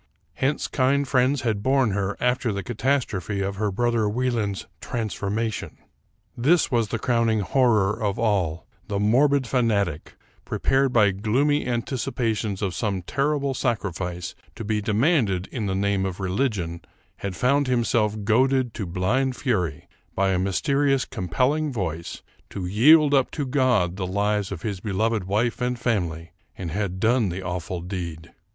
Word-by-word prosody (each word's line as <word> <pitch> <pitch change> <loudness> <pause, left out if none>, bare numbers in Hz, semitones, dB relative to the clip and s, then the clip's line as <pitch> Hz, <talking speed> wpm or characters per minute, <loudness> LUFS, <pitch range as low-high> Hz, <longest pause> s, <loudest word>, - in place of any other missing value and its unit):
Hence 140 +3 -1
kind 140 +1 +1
friends 130 +1 +2
had 110 -4 -1
borne 130 -1 +2
her 100 0 -2
after 125 -1 +1
the 100 -1 -3
catastrophe 110 -6 -1
of 100 0 -2
her 105 0 0
brother 115 +1 +1
Wie 125 +4 0
land's 105 -5 -2
"transformation." 110 -1 -3 0.6
This 150 +8 +3
was 115 -3 +2
the 115 - -2
crowning 115 -2 +1
horror 110 -1 +2
of 100 -1 0
all: 95 -8 0 0.2
the 100 -1 -2
morbid 135 +6 +3
fanatic, 105 - 0 0.3
prepared 135 0 +1
by 105 -5 +4
gloomy 125 +10 +1
anticipations 115 -4 -2
of 95 -3 -1
some 100 -5 -2
ter 135 +10 -1
rible 140 -1 -2
sacrifice 90 - -2 0.2
to 115 - -6
be 105 0 -1
demanded 110 - +1
in 110 -5 -3
the 95 - -1
name 100 0 +1
of 95 0 -6
religion, 95 -4 -1 0.4
had 100 -2 -5
found 140 +6 +2
himself 110 -4 +1
goaded 130 +2 +2
to 100 - -4
blind 115 +10 0
fury, 90 - -1 0.3
by 95 -1 +2
a 90 - +1
mysterious 135 +8 +1
compelling 125 - 0
voice, 85 - -4 0.3
to 95 - -5
yield 145 - +5
up 135 -2 +3
to 145 - -3
God 125 -10 +1
the 95 -2 -2
lives 100 +1 0
of 90 -4 -6
his 100 -4 -3
beloved 105 +1 -1
wife 110 +6 0
and 125 0 0
family; 85 -9 -2 0.3
and 85 -3 -5
had 95 0 -2
done 115 0 +2
the 90 +2 -5
awful 90 0 -4
deed! 85 -3 -6
110 Hz, 155 wpm, -24 LUFS, 95-125 Hz, 0.6 s, yield